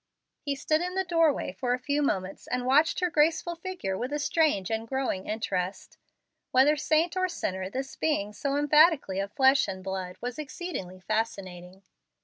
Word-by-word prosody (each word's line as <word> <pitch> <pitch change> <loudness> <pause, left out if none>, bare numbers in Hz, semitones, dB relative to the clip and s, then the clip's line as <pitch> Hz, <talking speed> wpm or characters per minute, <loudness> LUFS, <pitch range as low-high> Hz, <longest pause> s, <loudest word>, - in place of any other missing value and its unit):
He 285 -1 -2
stood 310 +3 +1
in 360 +1 -3
the 380 - +1
door 330 -3 +3
way - - -4
for 250 -2 0
a - - -9
few 285 +3 -1
moments 195 -8 -2
and 250 +1 -2
watched 295 +8 +3
her 360 -1 +1
graceful 325 +3 +2
figure 345 - -4
with 250 +7 -4
a 295 - 0
strange 295 - +1
and 225 +1 -2
growing 265 -7 -2
interest 195 -4 -3 0.5
Whether 270 +4 +5
saint 315 +3 +1
or 370 0 +1
sinner, 190 - -3
this 265 +5 -5
being 210 -10 -1
so 280 +5 -2
emphatically 295 - +4
of 200 +1 -3
flesh 270 +1 +4
and 190 -1 -6
blood 190 -1 -4
was 245 +3 -5
exceedingly 270 - -6
fascinating. 190 -4 -4
265 Hz, 175 wpm, -28 LUFS, 195-310 Hz, 0.5 s, Whether